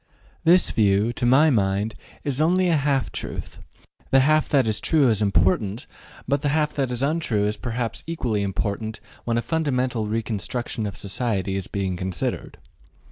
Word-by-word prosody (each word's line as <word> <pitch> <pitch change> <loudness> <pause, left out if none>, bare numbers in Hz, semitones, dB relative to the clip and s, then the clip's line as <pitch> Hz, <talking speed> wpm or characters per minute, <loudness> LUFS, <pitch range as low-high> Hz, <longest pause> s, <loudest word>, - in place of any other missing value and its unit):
This 175 +2 +5
view, 105 +2 +2
to 120 - -1
my 145 +5 +5
mind, 100 -1 +1 0.3
is 140 -1 -1
only 180 +3 +3
a 165 - +3
half 140 -2 0
truth; - - -6 0.5
the 135 - +5
half 155 +3 +3
that 135 -4 +3
is 110 -1 +1
true 150 -6 +3
is 110 -2 +2
important, 100 +3 +1 0.4
but 140 0 +1
the 145 - 0
half 150 +1 +1
that 135 -3 -1
is 125 +1 -2
untrue 140 -9 0
is 105 +1 0
perhaps 115 +1 -4
equally 125 -11 -1
important 100 +2 -3 0.3
when 115 -1 0
a 120 - 0
fundamental 130 -6 -1
reconstruction 110 +1 -2
of 100 - -6
society 100 -2 -2
is 95 -2 -3
being 95 -3 -2
considered. 95 0 -4
120 Hz, 165 wpm, -23 LUFS, 105-140 Hz, 0.5 s, This